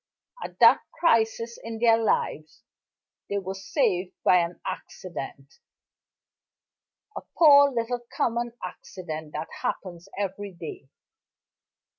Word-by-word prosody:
At - - -8
that - - +7 0.2
crisis 230 -5 +2
in 225 0 -5
their 225 0 +4
lives, 155 -7 -1 0.7
they 200 - -1
were 190 -1 -3
saved 190 - 0
by 180 - +6
an 170 0 -2
accident; 140 -6 -7 1.6
a - - -4 0.2
poor 285 -3 +8
little 240 0 -2
common 235 0 -1
accident 160 -4 -8
that 155 +2 -4
happens 175 0 -4
every 200 0 -4
day. 160 -5 -9
195 Hz, 105 wpm, -26 LUFS, 175-230 Hz, 1.6 s, poor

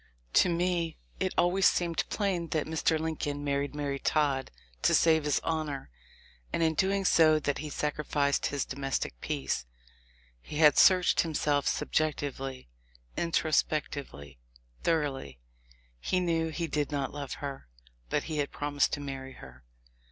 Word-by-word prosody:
To - - +5
me 170 -1 0 0.2
it - - +1
has - - -25
always 180 +2 +4
seemed 170 -2 0
plain 190 -5 -1
that 155 -2 -1
Mr. 160 0 +1
Lincoln 145 -2 -3
mar 140 -1 +1
ried 140 +1 -4
Mary 140 -2 -2
Todd 140 -4 +1 0.3
to - - +4
save 160 -2 +4
his 150 - +2
honor, 155 - -3 0.6
and 165 - 0
in 160 -1 +3
doing 195 +4 +1
that 155 -3 +4
he 155 - -5
sacrificed 145 -1 0
his 140 -2 -2
domestic 135 - -3
peace. 65 -3 -2 0.7
He 150 - -7
had 150 -2 +6
searched 185 -2 +6
himself 150 -3 0
subjectively, 140 - -1 0.5
introspectively, 145 - -1 0.4
thoroughly; 140 - -1 0.6
he 185 - 0
knew 165 -2 0
he 165 +2 -2
did 150 -2 -1
not 140 -2 -2
love 145 -2 -5
her, 140 - -6 0.4
but - - 0
he 155 -2 -3
had 145 - 0
promised 145 -1 0
to 145 - -2
marry 135 -1 -6
her! 65 - -14
150 Hz, 145 wpm, -29 LUFS, 140-165 Hz, 0.7 s, had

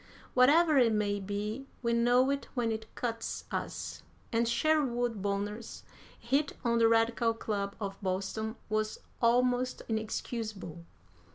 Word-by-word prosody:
Whatever 295 +4 +6
it 230 -3 +4
may 205 -1 +1
be, 210 +6 -4 0.2
we 235 0 +2
know 245 +3 +4
it 280 0 -2
when 235 -3 +1
it 220 0 -4
cuts 230 -2 -3
us, - - -4 0.3
and 230 +1 +2
Sherwood 245 -4 +1
Bonner's 205 +3 -3 0.3
hit 275 +5 0
on 235 0 +3
the 230 - +6
Radical 230 0 +3
Club 200 -3 -3
of 195 -1 -5
Boston 200 +4 -2
was 215 0 -1 0.2
almost 250 +1 +2
inexcusable. 215 -5 -4
230 Hz, 125 wpm, -31 LUFS, 210-245 Hz, 0.3 s, Whatever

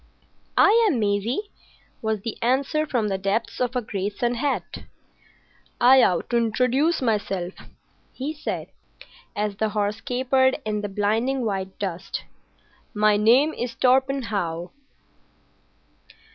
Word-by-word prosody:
"I 455 +3 +6
am 265 - 0
Maisie," 220 - -1 0.5
was 220 -2 -1
the 225 +1 -4
answer 275 +5 +1
from 235 -7 0
the 195 -2 -2
depths 200 +6 -2
of 250 0 0
a 250 - 0
great 200 -1 -4
sun 240 0 0
hat. 270 +4 -3 0.9
"I 260 +2 +7
ought 180 -7 +2
to 240 - +3
introduce 250 +7 +1
myself," 195 -5 -1 0.6
he 280 +4 -4
said, 305 - -5 0.7
as 205 -1 -2
the 220 0 0
horse 210 0 -2
capered 260 +1 +2
in 210 -1 -1
the 205 - -4
blinding 225 +6 0
white 190 -2 -3
dust. 195 -2 -4 0.7
"My 210 0 +4
name 245 +9 +4
is 240 -1 -4
Torpenhow. 230 -10 0
225 Hz, 125 wpm, -24 LUFS, 205-260 Hz, 0.9 s, I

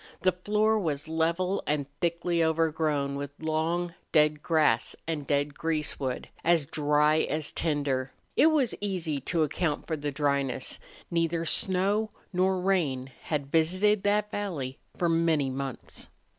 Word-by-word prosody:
The 185 - +5
floor 210 +4 +1
was 150 -5 -2
level 170 +4 0
and 150 -1 0
thickly 170 0 +1
overgrown 155 -3 +1
with 140 0 -4
long, 165 +2 -1 0.2
dead 150 -1 +3
grass 150 -9 +2
and 150 -4 -3
dead 145 0 +1
greasewood, 150 -5 -2 0.2
as 165 -3 +3
dry 150 0 +3
as 155 -1 -1
tinder. 140 -4 -1 0.2
It 310 - +6
was 295 -7 +2
easy 180 -8 -1
to 165 +4 +1
account 155 +1 -1
for 160 - -2
the 145 -1 -3
dryness; 140 -3 -1 0.3
neither 165 0 0
snow 195 +5 +1 0.2
nor 185 +1 +2
rain 150 -9 0
had 140 -3 -2
visited 185 +6 +3
that 210 +1 +1
valley 155 -11 -4 0.2
for 175 - +1
many 165 -4 +2
months. 135 -1 -6
160 Hz, 135 wpm, -28 LUFS, 145-180 Hz, 0.3 s, It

